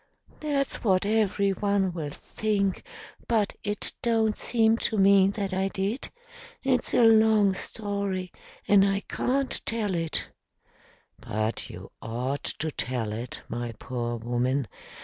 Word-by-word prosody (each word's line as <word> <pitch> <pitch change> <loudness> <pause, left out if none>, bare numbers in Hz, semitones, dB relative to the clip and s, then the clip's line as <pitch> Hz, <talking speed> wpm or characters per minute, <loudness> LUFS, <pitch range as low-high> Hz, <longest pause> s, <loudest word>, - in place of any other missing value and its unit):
"That's 280 -3 -1
what 190 -3 +3
everyone 200 -2 +1
will 160 -4 -4
think, 200 +4 -1 0.5
but 220 -4 +1
it 210 -1 -2
don't 225 -2 +2
seem 225 -1 +2
to 220 - 0
me 195 -1 +6
that 200 -1 -2
I 190 +1 +1
did. 195 +6 -3 0.5
It's 260 -2 +2
a - - +5
long 220 -3 +5
story, 200 -2 -3 0.4
and 200 -1 +6
I 195 0 +1
can't 270 +5 -1
tell 220 -4 -1
it." 165 -2 0 0.9
"But 110 +2 -3
you - - -10
ought 125 +5 -3
to 160 0 -2
tell 115 -4 -2
it, 120 +3 -6
my 120 0 -4
poor 120 -1 -3
woman. 120 +3 -1
195 Hz, 130 wpm, -27 LUFS, 140-220 Hz, 0.9 s, me